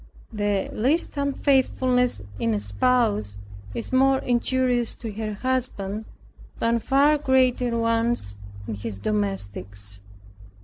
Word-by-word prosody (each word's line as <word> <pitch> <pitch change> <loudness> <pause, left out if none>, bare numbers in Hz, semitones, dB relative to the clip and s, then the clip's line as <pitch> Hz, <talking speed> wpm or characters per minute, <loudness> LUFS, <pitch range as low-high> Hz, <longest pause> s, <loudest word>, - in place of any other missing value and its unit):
The 205 -2 0
least 285 +11 +1
unfaithfulness 260 - +1 0.2
in 115 -1 +1
a - - 0
spouse 105 - +1 0.4
is - - -4
more 265 +1 +5
injurious 245 -1 +1
to 225 -2 -6
her 215 0 -4
husband, 220 -4 -2 0.5
than 230 0 +1
far 280 +6 +3
greater 255 -3 +2
ones 230 - +1 0.3
in 110 - -3
his 105 0 -5
domestics. 100 0 -3
230 Hz, 105 wpm, -24 LUFS, -, 0.5 s, more